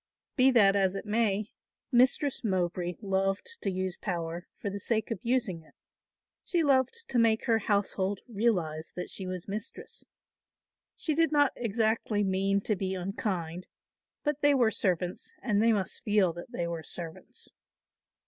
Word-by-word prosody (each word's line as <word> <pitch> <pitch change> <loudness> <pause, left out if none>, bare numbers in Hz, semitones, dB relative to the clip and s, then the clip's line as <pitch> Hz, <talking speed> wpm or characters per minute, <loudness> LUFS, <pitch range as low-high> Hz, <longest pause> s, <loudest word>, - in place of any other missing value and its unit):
Be 260 -1 +6
that 205 -6 +5
as 195 -1 +2
it 195 - -5
may, 210 -1 0 0.4
Mistress 255 +3 +3
Mowbray 180 -3 -1
loved 195 - -1
to - - 0
use 185 -1 -2
power 170 -2 -4
for 200 - -4
the 200 - -4
sake 220 +3 -1
of 225 - -2
using 235 -8 0
it; 160 - -23 0.7
she 345 -2 +1
loved 280 - +2
to 245 - +2
make 225 -1 +3
her 225 -1 +3
household 200 -2 0
realise 185 -9 0
that 180 - -5
she 190 - -3
was 185 -1 -5
mistress. 210 +2 -6 0.9
She 315 - -1
did 325 +1 +3
not 290 -2 +4
exactly 220 -2 0
mean 195 +1 +1
to 215 - 0
be 190 0 -2
unkind, 185 -3 -3 0.6
but 295 -1 -1
they 290 -1 +5
were 240 -4 +4
servants 180 -3 -1
and 210 -5 +1
they 230 +1 +5
must 195 -3 0
feel 205 -5 +3
that 175 +7 -9
they 175 -9 -2
were 170 -1 -3
servants. 165 +1 -6
200 Hz, 160 wpm, -29 LUFS, 185-235 Hz, 0.9 s, Be